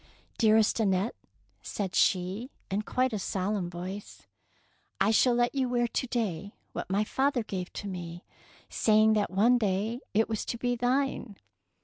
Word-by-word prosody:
Dearest 220 0 +4
Annette,'' 195 0 +1 0.5
said 195 -3 -4
she, 190 +6 +1 0.2
in 200 +2 +1
quite 255 +3 0
a 210 - -1
solemn 190 -1 -2
voice, 185 +4 -7 0.4
" - - -37 0.3
I - - +4
shall 240 +2 +4
let 240 0 +2
you 265 -3 0
wear 240 -1 +1
to 255 - -2
day 205 -6 -3 0.2
what - - -5
my 200 +2 +2
father 265 +2 0
gave 185 -4 -5
to 205 - -5
me, 175 -2 -7 0.4
say 215 -1 +3
ing 220 0 +5
that 210 -1 +1
one 225 +7 +4
day 210 +3 0 0.2
it 220 +1 +4
was 220 -2 -2
to 235 - -3
be 245 +1 0
thine. 250 -2 0
215 Hz, 165 wpm, -29 LUFS, 190-240 Hz, 0.5 s, ing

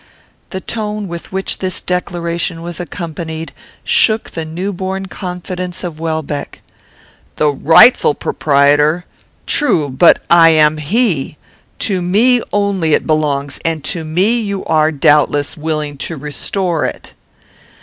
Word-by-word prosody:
The 190 - -5
tone 210 -1 -4
with 170 -1 -8
which 190 0 -2
this 185 -1 -2
declaration 170 -1 -3
was 170 -1 -6
accompanied 165 -1 -6 0.3
shook 220 -1 +2
the 165 -1 -5
new 180 +6 -4
born 190 +1 -4
confidence 180 -1 -6
of 165 -3 -6
Welbeck. 160 -3 -4 0.7
"The 150 - +2
rightful 150 - +5
proprietor! 145 +4 +2 0.4
true, 165 - +2
but 135 +6 +5
I 170 -1 +6
am 155 -1 +4
he. 155 - 0 0.5
To 190 -4 -1
me 230 +8 +3
only 200 -6 +1
it - - -2
belongs, 145 -3 -1
and 160 -3 -2
to 165 +3 -2
me 185 +10 +1
you 200 -3 -4
are, 155 -1 +2
doubtless, 145 0 +2
willing 150 -2 -3
to 160 +3 -4
restore 160 +4 -2
it." - - -5
170 Hz, 130 wpm, -15 LUFS, 155-190 Hz, 0.7 s, I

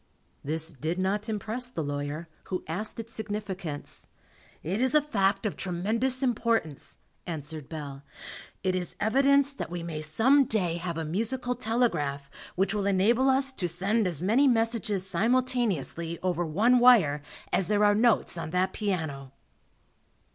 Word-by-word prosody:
This 160 +3 0
did 155 +4 -3
not 200 +4 -1
impress 220 +4 -2
the 165 -10 -4
lawyer, 145 +3 -4 0.2
who 185 - -4
asked 205 +8 -4
its 230 0 -8
significance. 200 -8 -5 0.6
"It 190 +8 -2
is 260 +2 +2
a - - +8
fact 200 -8 0
of 210 - -1
tremendous 225 +9 0
importance," 230 - -1 0.3
answered 155 -3 -5
Bell. 145 -4 -7 0.6
"It 185 -1 +1
is 180 -2 -3
evidence 275 +5 +3
that - - -6
we 175 -1 -5
may 160 -2 -5
some 240 - +4
day 180 -8 0
have 170 -1 -4
a 165 - -2
musical 230 +9 -1
telegraph 220 - -1 0.2
which 195 +3 +1
will 205 -2 -1
enable 225 +7 +3
us 270 +1 +2
to 180 -8 -1
send 195 +5 +1
as 170 -2 -4
many 240 +9 +4
messages 225 -5 +1
simultaneously 195 - 0
over 175 -2 0
one 225 +10 +3
wire 200 -13 +5 0.3
as 190 - +2
there 210 0 +3
are 205 - +5
notes 215 -5 +2
on 160 -1 -4
that 180 +3 0
piano." 160 -10 -3
195 Hz, 150 wpm, -28 LUFS, 165-230 Hz, 0.6 s, a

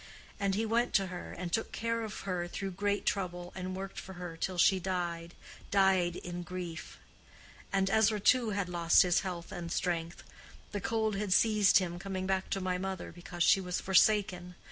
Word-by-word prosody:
And 195 -1 +1
he 220 +2 0
went 235 +2 +1
to 195 - +4
her, 175 - -7
and 175 -1 -6
took 225 - 0
care 230 +1 -2
of 215 -1 -6
her 180 -3 -2
through 195 +2 -4
great 205 +2 -1
trouble, 175 -2 -2
and 185 0 -5
worked 195 0 -6
for 190 - -9
her 175 -2 -7
till 180 +2 -3
she 190 +2 +5
died—died 180 +1 -1
in 175 0 -6
grief. 175 -2 -7 0.7
And 195 -1 +2
Ezra, 220 +1 +3
too, 235 +3 +4
had 200 -2 -1
lost 170 0 +4
his 180 -1 +3
health 180 -3 -5
and 170 -2 -6
strength. 170 -2 -2 0.5
The 205 - -3
cold 220 0 0
had 200 -2 +1
seized 210 -1 +5
him 175 -2 -1
coming 190 0 -4
back 190 0 -1
to 195 - -1
my 185 -1 -1
mother, 190 -1 -4
because 175 0 -4
she 195 - +5
was 180 -1 -2
forsaken. 190 -2 +2
190 Hz, 185 wpm, -31 LUFS, 175-200 Hz, 0.7 s, she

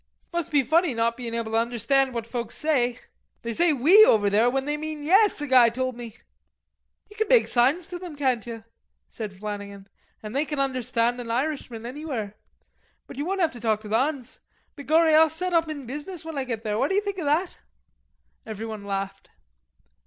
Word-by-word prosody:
"Must 345 -3 -2
be 290 -2 +3
funny 315 +1 +2
not 230 0 +1
bein' 235 -2 -5
able 230 -1 -3
to 225 - +2
understand 245 +4 +1
what 230 -1 -3
folks 235 -1 -5
say. 250 -6 0 0.4
They 230 0 -3
say 345 +6 +3
'we' 315 - +7
over 205 - +4
there 220 +4 +4
when 270 +1 -1
they 295 +1 -1
mean 305 0 -6
'yes,' 390 +6 +4
a - - -2
guy 255 -4 +6
told 255 +1 -3
me." 235 -1 -9 0.9
"Ye 415 - -16
can 440 0 -1
make 485 +1 +5
signs 270 +8 +2
to 355 - -6
them, 350 -4 -8
can't 260 -5 -1
ye?" 225 -1 -7 0.5
said 215 -3 -6
Flannagan 200 0 -7 0.4
"an' 215 - -6
they 275 +5 0
can 300 -1 -5
understand 245 -3 0
an 235 - -8
Irishman 245 -2 -3
anywhere. 250 -6 -5 0.7
But - - -12
ye - - -2
won't 380 +5 -2
'ave 325 -2 +1
to 240 - -10
talk 220 -2 0
to 215 - -10
the 220 +2 +2
'uns. 270 -3 -3 0.4
Begorry 315 +2 +3
I'll 315 +1 +6
set 360 +3 -2
up 330 -1 +2
in 290 -4 -6
business 295 +7 -7
when 325 -1 -6
I 270 -2 -2
get 230 -3 -4
there, 210 -1 -2
what - - +1
d'ye 385 +1 +2
think 400 -2 -4
of 330 - -4
that?" 320 +6 0 0.9
Everybody 220 0 -6
laughed. 195 -1 -5
260 Hz, 200 wpm, -25 LUFS, 230-315 Hz, 0.9 s, we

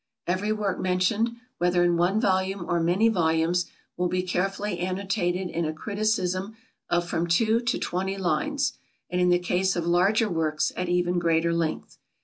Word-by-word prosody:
Every 190 +4 0
work 210 -3 -1
mentioned 185 +5 +1 0.3
whether 175 0 +3
in 175 -1 +3
one 180 +5 +2
volume 190 -3 0
or 170 - +1
many 175 +7 +3
volumes, 170 -3 +1 0.3
will 180 0 0
be 180 +1 -1
carefully 195 +1 -2
annotated 185 0 -1
in 170 - -1
a 155 0 -2
criticism 200 +1 -1 0.3
of 175 0 +1
from 170 -1 -1
two 220 +6 +3
to 235 0 -1
twenty 190 +2 -2
lines, 275 - 0 0.4
and 180 0 0
in 180 - +4
the 175 - +5
case 180 +1 0
of 170 -2 -2
larger 190 +6 +3
works 160 -4 0
at 180 -1 -3
even 175 0 +1
greater 170 0 +2
length. 165 -2 -3
180 Hz, 165 wpm, -26 LUFS, 175-200 Hz, 0.4 s, the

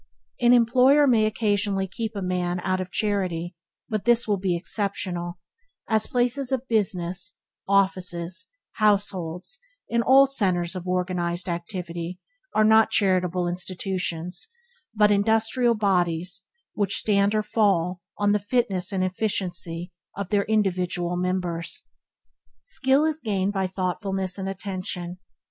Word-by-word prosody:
An 240 0 +4
employer 250 +4 +5
may 225 -5 +4
occasionally 205 -2 0
keep 220 +3 -5
such 200 - -3
a - - -3
man 180 -1 -1
out 185 +1 -1
of 185 - -6
charity; 185 -5 -1 0.3
but 215 -3 -2
this 240 -1 +4
will 205 -2 +1
be 185 -2 0
exceptional; 180 -2 -2 0.5
as 220 -1 +2
places 250 +2 0
of 260 0 -2
business, 195 -2 0 0.3
offices, 185 -2 0 0.3
households, 200 - 0 0.3
and 235 0 +2
all 265 +3 +6
centers 185 -9 +1
of 185 0 -6
organized 180 0 -1
activity, 175 0 -5 0.4
are 215 - +4
not 220 0 +5
charitable 185 -4 +1
institutions, 180 - -1 0.5
but 210 -1 +4
industrial 225 +4 +2
bodies 180 -2 0 0.3
which 200 -2 +1
stand 200 0 +2
or 215 - +1
fall 185 -5 +1 0.2
but 205 0 +2
the 210 - +2
fitness 205 -4 0
and 190 -2 0
efficiency 180 -3 -2 0.3
of 200 -2 -4
their 205 -1 +1
individual 180 -4 0
members. 180 +6 -1 0.8
Skill 275 - +1
is 315 0 -1
gained 200 -3 -1
by 190 -2 0
thoughtfulness 190 +1 -2
and 190 0 -3
attention. 185 -2 -5
195 Hz, 130 wpm, -25 LUFS, 180-215 Hz, 0.8 s, all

